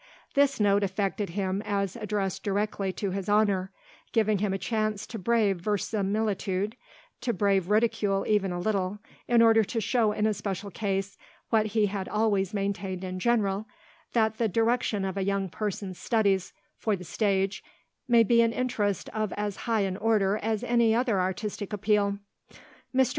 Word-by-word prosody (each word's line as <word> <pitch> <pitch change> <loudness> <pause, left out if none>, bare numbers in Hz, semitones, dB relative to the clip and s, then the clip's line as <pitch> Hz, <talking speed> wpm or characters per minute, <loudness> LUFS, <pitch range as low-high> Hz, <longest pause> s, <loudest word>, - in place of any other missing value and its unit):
This 280 -2 +3
note 205 -1 +4
affected 195 +1 -1
him 190 +2 -2
as 200 -3 -1
addressed 210 -4 -2
directly 200 -1 -1
to 200 0 -3
his 195 +1 -3
honour, 205 -3 +2 0.4
giving 215 -3 +2
him 205 0 0
a 195 - 0
chance 215 +1 -1
to 225 - -7
brave 210 -2 +2
verisimilitude, 205 +1 -1 0.5
to 240 - 0
brave 195 -2 +1
ridicule 210 -2 +2
even 205 -3 +2
a 175 - -3
little, 195 0 -1 0.3
in 235 -1 +5
order 225 -1 +6
to 230 - -2
show 225 0 +2
in 210 0 0
a 215 - +2
special 200 0 -4
case 195 -1 -2 0.3
what 215 -2 +3
he 215 - +5
had 195 -1 -3
always 205 -3 +1
maintained 195 -2 -3
in 185 0 -4
general, 210 -2 +1 0.5
that 220 -2 +1
the 230 - +3
direction 225 -1 +1
of 190 0 -3
a 195 - 0
young 195 -1 -1
person's 195 -1 -4
studies 200 -5 +1 0.3
for 215 -2 +1
the 180 - -9
stage 195 +1 0 0.4
may 235 -1 +6
be 235 +1 +4
an 230 0 +2
interest 210 -6 -1
of 215 -2 -2
as 205 -1 -3
high 225 -2 +3
an 190 -1 -1
order 210 -2 +2
as 220 0 -1
any 235 -2 +3
other 230 -6 +2
artistic 195 +2 -3
appeal. 205 -1 +1 0.7
"Mr. 260 -1 +3
205 Hz, 165 wpm, -28 LUFS, 195-220 Hz, 0.7 s, order